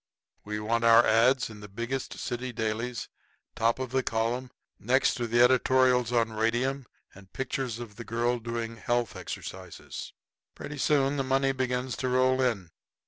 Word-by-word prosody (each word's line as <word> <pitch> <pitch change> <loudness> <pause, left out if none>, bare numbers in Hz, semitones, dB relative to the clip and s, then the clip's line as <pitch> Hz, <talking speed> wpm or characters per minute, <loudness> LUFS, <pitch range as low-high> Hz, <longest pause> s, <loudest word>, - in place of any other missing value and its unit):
We 105 0 -4
want 115 +2 0
our 115 0 +7
ads. 120 +3 +3
in 105 - -11
the 105 - -9
biggest 120 +6 -4
city 125 +1 -4
dailies, 115 +2 -3 0.5
top 115 +1 +2
of 130 -1 -4
column, 120 +3 -1 0.3
next 130 +5 +2
to 120 - -1
editorials 125 +1 +4
on 115 -2 +1
radium 120 +4 0 0.3
and 95 -1 -16
pictures 130 -3 -3
of 115 -4 -9
the 115 - -6
girl 120 +1 0
doing 115 0 -4
health 120 0 -1
exercises." 95 -2 -7 0.4
Pretty 150 -1 -7
soon 145 -1 +2
the 135 - 0
money 135 +1 +2
begins 130 -1 -2
to 130 - -1
roll 130 +1 +3
in. 105 -10 -1
120 Hz, 150 wpm, -28 LUFS, 115-130 Hz, 0.5 s, our